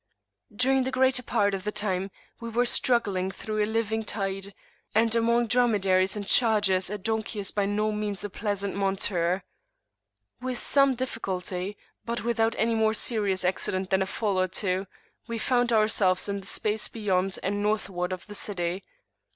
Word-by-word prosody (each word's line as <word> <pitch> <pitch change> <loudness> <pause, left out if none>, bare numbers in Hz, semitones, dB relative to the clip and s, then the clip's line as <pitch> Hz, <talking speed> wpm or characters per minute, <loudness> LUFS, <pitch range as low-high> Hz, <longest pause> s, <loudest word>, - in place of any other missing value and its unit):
During 260 +5 +2
the 260 - -2
greater 260 -1 +2
part 205 -4 +1
of 190 -1 -3
the 210 - -2
time 195 -2 -2 0.3
we 230 - -6
were 240 +2 +1
struggling 205 -7 +2
through 215 +2 -3
a 210 - -2
living 220 0 -1
tide; 195 -2 -3 0.4
and 225 +1 +3
among 235 +1 +3
dromedaries 200 -6 +2
and 205 -1 -4
chargers 205 -5 +3
a 210 - -3
donkey 220 +2 -3
is 200 -2 -1
by 200 -1 0
no 210 +1 0
means 210 -2 -2
a 205 - -4
pleasant 200 -1 -2
monture. 195 -2 0 1.0
With 255 -1 -3
some 275 0 +4
difficulty, 195 -5 -4 0.3
but 235 -1 -3
without 230 -1 +1
any 230 +1 +1
more 220 0 +2
serious 205 -5 0
accident 185 +1 -1
than 190 0 +3
a 190 - 0
fall 200 -2 -1
or 185 - +2
two, 185 +1 -1 0.4
we 230 -1 -3
found 245 +1 +1
ourselves 215 -4 +3
in 200 0 -2
the 195 - -11
space 215 +1 0
beyond 195 -3 -1
and 205 +1 -1
northward 200 -4 -1
of 185 -1 -5
the 210 - -10
city. 185 -2 -1
210 Hz, 165 wpm, -27 LUFS, 190-225 Hz, 1.0 s, some